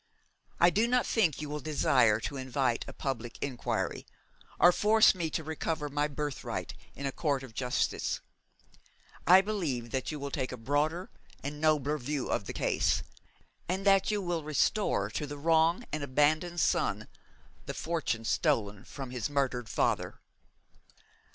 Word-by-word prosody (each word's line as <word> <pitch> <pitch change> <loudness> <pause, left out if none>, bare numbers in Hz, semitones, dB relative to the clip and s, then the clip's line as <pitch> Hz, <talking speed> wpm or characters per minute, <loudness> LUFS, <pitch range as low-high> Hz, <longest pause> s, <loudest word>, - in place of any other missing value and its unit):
I 175 +1 +6
do 220 +5 +2
not 250 0 +2
think 170 - +1
you - - -4
will 150 +1 -3
desire 130 -6 +3
to 140 - -4
invite 130 -2 -1
a - - -6
public 120 -4 -4
inquiry, 130 -4 -3 0.5
or 175 - +8
force 215 +4 +5
me 170 -3 -2
to 160 - -3
recover 155 -1 -3
my 145 +1 0
birthright 145 -2 -4 0.2
in 140 - -6
a 135 - 0
court 140 -2 -1
of 125 -4 -10
justice. 125 +2 -1 1.1
I 185 +3 +9
believe 160 - -3
that 130 +2 -2
you 150 - -5
will 140 0 -5
take 130 -2 -2
a 125 - -6
broader 150 +9 -1 0.3
and 145 +2 -5
nobler 150 -1 +2
view 140 +1 -3
of - - -1
the - - -5
case, - - +1 0.7
and 190 +2 -1
that 195 -1 +5
you 210 -2 0
will 175 -3 -2
restore 150 - +1
to 150 - -3
the 145 +1 -6
wronged 165 +7 +3
and 150 - -1
abandoned 155 +5 +1
son - - +1 0.6
the - - -4
fortune 155 -9 -2
stolen 100 +1 0
from 135 -3 -7
his 125 -2 -3
murdered 130 -5 -1
father.' - - 0
145 Hz, 155 wpm, -30 LUFS, 130-165 Hz, 1.1 s, I